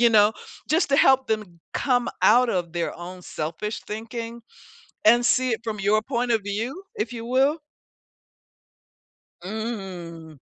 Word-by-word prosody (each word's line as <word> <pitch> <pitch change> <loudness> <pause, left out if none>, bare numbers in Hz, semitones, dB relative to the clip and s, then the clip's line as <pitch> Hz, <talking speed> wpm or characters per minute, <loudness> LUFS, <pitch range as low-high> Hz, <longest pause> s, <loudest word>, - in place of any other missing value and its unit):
you 240 - +7
know? 210 0 +6 0.4
Just 320 0 +3
to 275 - +4
help 265 -1 +5
them 205 -6 -3
come 245 -3 +1
out 250 +1 +6
of 175 -4 -2
their 170 -1 -2
own 180 +2 -8
selfish 165 +8 -4
thinking, 230 +2 -6 0.6
and 240 +2 +6
see 255 0 +3
it 225 - -1
from 215 -2 -3
your 205 +2 +3
point 245 0 -1
of 220 -3 +2
view, 230 - -3
if 215 +3 -2
you 230 -1 -6
will. 270 +5 +3 1.9
Mm. 185 -7 -6
220 Hz, 145 wpm, -24 LUFS, 195-245 Hz, 1.9 s, you